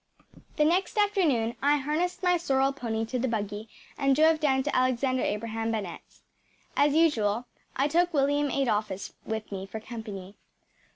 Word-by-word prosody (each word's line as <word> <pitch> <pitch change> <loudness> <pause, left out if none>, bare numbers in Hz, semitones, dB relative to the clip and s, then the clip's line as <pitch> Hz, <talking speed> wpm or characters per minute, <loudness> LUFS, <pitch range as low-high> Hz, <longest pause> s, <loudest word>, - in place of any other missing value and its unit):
The 300 - +3
next 360 +6 +1
afternoon 320 - +2
I 290 +1 +4
harnessed 315 +6 -2
my 360 -1 +4
sorrel 275 -5 +1
pony 225 -4 -2
to 250 +3 -3
the 260 - 0
buggy 210 -1 -3 0.3
and 275 -1 +3
drove 315 +2 +4
down 265 -4 +2
to 290 - -2
Alexander 255 0 +1
Abraham 225 +1 -2
Bennett’s. 205 -6 -6 0.5
As 290 +1 +3
usual, 240 -8 +2 0.3
I 275 - +2
took 345 +4 +2
William 290 -1 +2
Adolphus 215 -8 -1
with 220 -1 -4
me 195 -1 -5
for 220 - -6
company. 210 -4 -8
260 Hz, 155 wpm, -28 LUFS, 220-295 Hz, 0.5 s, I